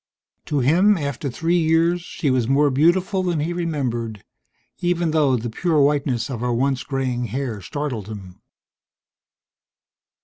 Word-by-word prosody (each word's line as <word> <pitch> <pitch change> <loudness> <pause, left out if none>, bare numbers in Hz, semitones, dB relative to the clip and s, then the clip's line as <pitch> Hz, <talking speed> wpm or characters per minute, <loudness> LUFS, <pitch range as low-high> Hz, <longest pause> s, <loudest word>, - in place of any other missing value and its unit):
To 145 -3 0
him, 180 +10 +4
after 140 -2 -3
three 165 +7 0
years, 165 +2 +2
she 155 -4 -2
was 125 -3 +1
more 140 +2 +3
beautiful 180 +7 +2
than 175 -4 -1
he 165 +3 -2
remembered, 125 - -3 0.6
even 175 -2 0
though 150 -4 +3
the 120 -1 -3
pure 165 +5 +1
whiteness 140 -5 +1
of 130 -5 -5
her 125 +1 -1
once 130 +2 0
graying 130 -3 -2
hair 120 -2 -4
startled 125 -3 -4
him. 95 -4 -10
140 Hz, 140 wpm, -22 LUFS, 120-165 Hz, 0.6 s, him